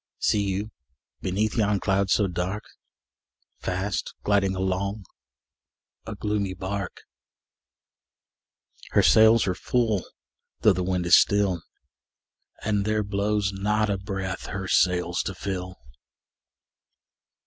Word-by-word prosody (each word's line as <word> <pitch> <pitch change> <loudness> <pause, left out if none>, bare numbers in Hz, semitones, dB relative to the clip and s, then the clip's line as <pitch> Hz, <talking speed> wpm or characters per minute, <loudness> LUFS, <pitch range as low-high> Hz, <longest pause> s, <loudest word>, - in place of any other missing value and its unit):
See 105 - +2
you, 100 +2 -2 0.5
beneath 105 +3 -1
yon 105 -3 +2
cloud 100 0 +1
so 105 - +3
dark, 90 +4 -3 1.0
Fast 95 -1 -3
gliding 100 -2 +2
along 95 +2 -2 1.0
a - - -5
gloomy 105 -3 -2
bark? 95 0 -5 1.9
Her - - +5
sails 110 +1 +6
are 95 - 0
full, 110 -1 0 0.6
though 105 - +6
the 90 - -2
wind 90 -1 -1
is 85 - +7
still, 100 -4 +3 1.0
And 105 -2 +1
there 110 +1 0
blows 100 0 0
not 105 +2 0
a 100 - 0
breath 95 -1 -4
her 95 0 -4
sails 90 -2 +2
to 95 - -5
fill! 95 -1 -5
100 Hz, 110 wpm, -25 LUFS, 95-105 Hz, 1.9 s, is